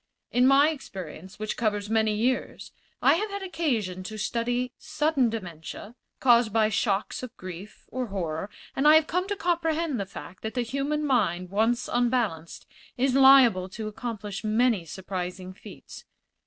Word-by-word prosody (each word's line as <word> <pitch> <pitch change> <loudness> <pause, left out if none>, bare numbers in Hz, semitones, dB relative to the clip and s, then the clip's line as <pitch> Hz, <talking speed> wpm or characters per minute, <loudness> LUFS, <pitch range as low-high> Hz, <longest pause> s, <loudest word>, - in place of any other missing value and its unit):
In 250 +1 +4
my 280 +3 +6
experience, 190 - -9
which 215 0 -3
covers 210 -3 -1
many 220 -1 +2
years, 245 +5 -1 0.3
I - - +6
have 425 +3 -2
had 400 -1 -5
occasion 245 - -2
to 215 +2 -6
study 240 +3 -1
sudden 305 -5 +1
dementia, 190 0 -7 0.3
caused 240 -3 +4
by 215 0 +3
shocks 205 -2 -1
of 255 -3 -9
grief 185 +3 -9
or 255 -1 -3
horror, 180 -2 -3 0.3
and 275 +2 +2
I 305 - +8
have 315 -1 +5
come 360 +3 -1
to 410 - -2
comprehend 330 - 0
the 200 - -3
fact 185 -1 -10
that 220 +3 -5
the 245 - +1
human 280 +5 -2
mind, 185 -9 0
once 225 +4 +1
unbalanced, 235 -10 -1 0.3
is 260 +1 +2
liable 265 -9 +6
to 215 +3 -6
accomplish 215 -2 -5
many 220 -3 +2
surprising 185 +1 -6
feats. - - -12
225 Hz, 155 wpm, -26 LUFS, 195-270 Hz, 0.3 s, I